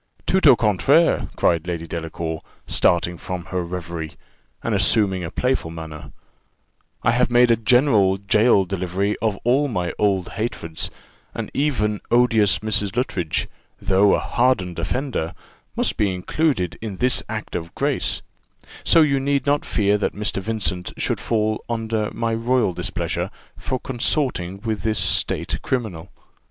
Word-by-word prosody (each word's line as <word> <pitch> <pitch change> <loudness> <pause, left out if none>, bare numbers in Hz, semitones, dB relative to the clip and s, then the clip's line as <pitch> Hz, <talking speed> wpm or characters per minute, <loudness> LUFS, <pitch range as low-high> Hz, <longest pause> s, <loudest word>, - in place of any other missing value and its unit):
"Tout 190 -4 +3
au 135 - +9
contraire," 120 - +3
cried 85 0 +1
Lady 85 -2 -3
Delacour, 80 -1 -4 0.2
starting 85 0 +2
from 90 -2 -5
her 90 -1 0
reverie, 85 -2 -5 0.5
and - - -1
assuming 95 -5 +3
a 80 - -4
playful 125 -7 -1
manner: 80 -2 -8 0.9
"I 115 - +4
have 125 +1 +2
made 120 0 +5
a - - +6
general 110 -4 +3
gaol 100 0 +3
delivery 95 +2 -1
of 110 -2 0
all 135 +5 +3
my 90 -9 -2
old 100 -4 +1
hatreds; 95 -8 -3 0.5
and - - -5
even 105 -8 0
odious 115 -5 +4
Mrs. 105 -1 +1
Luttridge, 95 -10 -1 0.3
though 100 +1 +4
a - - 0
hardened 100 -9 0
offender, 95 - -2 0.4
must - - +1
be 105 -2 +2
included 95 - -1
in 105 -4 -5
this 125 +4 +2
act 110 -1 -5
of 85 -1 -5
grace: - - 0 0.6
so 165 - +6
you 140 -2 +2
need 140 0 0
not 145 +1 +1
fear 105 -1 +1
that - - -1
Mr. 105 -1 -1
Vincent 100 -4 -3
should - - 0
fall 110 -1 0
under 110 -2 -1
my 115 -1 -2
royal 115 -3 +1
displeasure 85 -1 -3 0.3
for 130 - -3
consorting 120 - -1
with 110 -3 -2
this 110 -1 0
state - - 0
criminal. 105 -10 -3
105 Hz, 145 wpm, -22 LUFS, 90-120 Hz, 0.9 s, au